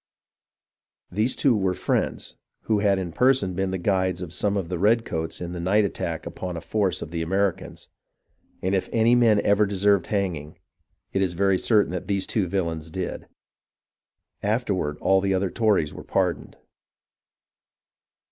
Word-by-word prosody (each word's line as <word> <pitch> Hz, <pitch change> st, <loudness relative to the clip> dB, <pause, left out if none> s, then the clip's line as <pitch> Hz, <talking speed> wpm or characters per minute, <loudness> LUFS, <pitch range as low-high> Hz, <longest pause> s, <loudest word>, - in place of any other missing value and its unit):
These 110 Hz, +7 st, 0 dB
two 130 Hz, -4 st, +3 dB
were 95 Hz, -3 st, 0 dB
Friends -, -, -2 dB, 0.3 s
who 110 Hz, -2 st, +1 dB
had 100 Hz, -1 st, +3 dB
in 90 Hz, -3 st, -3 dB
person 125 Hz, -3 st, +2 dB
been 95 Hz, +1 st, -1 dB
the 95 Hz, -, -2 dB
guides 95 Hz, -1 st, 0 dB
of 85 Hz, -2 st, -7 dB
some 100 Hz, +1 st, 0 dB
of 95 Hz, -4 st, -2 dB
the 90 Hz, 0 st, -3 dB
redcoats 100 Hz, -6 st, 0 dB
in 90 Hz, 0 st, -5 dB
a -, -, -5 dB
night 100 Hz, +5 st, +2 dB
attack 85 Hz, -4 st, -4 dB
upon 90 Hz, -2 st, -5 dB
a -, -, -5 dB
force 95 Hz, -4 st, -1 dB
of 80 Hz, -, -9 dB
the 85 Hz, -1 st, -3 dB
Americans, 95 Hz, +2 st, -2 dB, 0.8 s
and 95 Hz, +1 st, 0 dB
if 95 Hz, -, 0 dB
any 115 Hz, +1 st, +3 dB
men 115 Hz, -4 st, +5 dB
ever 105 Hz, +1 st, +3 dB
deserved 100 Hz, -1 st, +2 dB
hanging, 90 Hz, -8 st, -2 dB, 0.6 s
it 95 Hz, -, +1 dB
is 95 Hz, -2 st, 0 dB
very 95 Hz, +1 st, +2 dB
certain 105 Hz, -5 st, +2 dB
that 90 Hz, -1 st, -5 dB
these 100 Hz, -2 st, -1 dB
two 100 Hz, -5 st, 0 dB
villains 85 Hz, -4 st, -2 dB
did. 90 Hz, +2 st, -5 dB, 1.1 s
Afterward 100 Hz, -8 st, -1 dB
all 95 Hz, 0 st, +3 dB
the 95 Hz, 0 st, +1 dB
other 95 Hz, 0 st, 0 dB
Tories 105 Hz, -10 st, +1 dB
were -, -, -9 dB
pardoned. -, -, -1 dB
95 Hz, 160 wpm, -24 LUFS, 90-105 Hz, 1.1 s, men